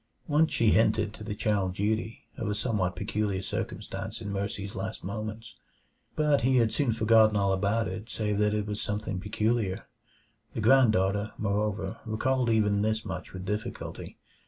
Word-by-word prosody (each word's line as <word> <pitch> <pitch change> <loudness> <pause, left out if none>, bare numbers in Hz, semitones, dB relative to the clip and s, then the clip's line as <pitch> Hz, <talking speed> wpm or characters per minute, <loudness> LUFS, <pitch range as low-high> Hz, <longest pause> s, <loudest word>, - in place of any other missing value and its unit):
Once 155 +1 +3
she 115 -2 +3
hinted 110 -1 +3
to 105 - -9
the 105 -1 -4
child 100 -3 0
Dutee 110 +3 -1
of - - -4
a 105 - 0
somewhat 105 -5 0
peculiar 100 0 -1
circumstance - - -4
in 100 - -5
Mercy's 100 0 -3
last 95 +3 -5
moments, 110 +3 -5 0.6
but 150 -3 +3
he 130 +2 +3
had 115 -2 +3
soon 140 -5 +2
forgotten 110 -1 +5
all 100 -1 +2
about 100 +3 +1
it 95 +5 -6
save 105 -2 -1
that 105 0 +2
it 105 -1 -1
was 105 0 -3
something 105 -2 -3
peculiar. 105 0 -1 0.7
The - - -2
granddaughter, 105 -5 +4
moreover, 105 +1 -1
recalled 125 +3 0
even 105 -2 +3
this 110 +1 0
much 95 - -5
with 95 0 -7
difficulty. 105 +4 -5
105 Hz, 160 wpm, -28 LUFS, 100-110 Hz, 0.7 s, forgotten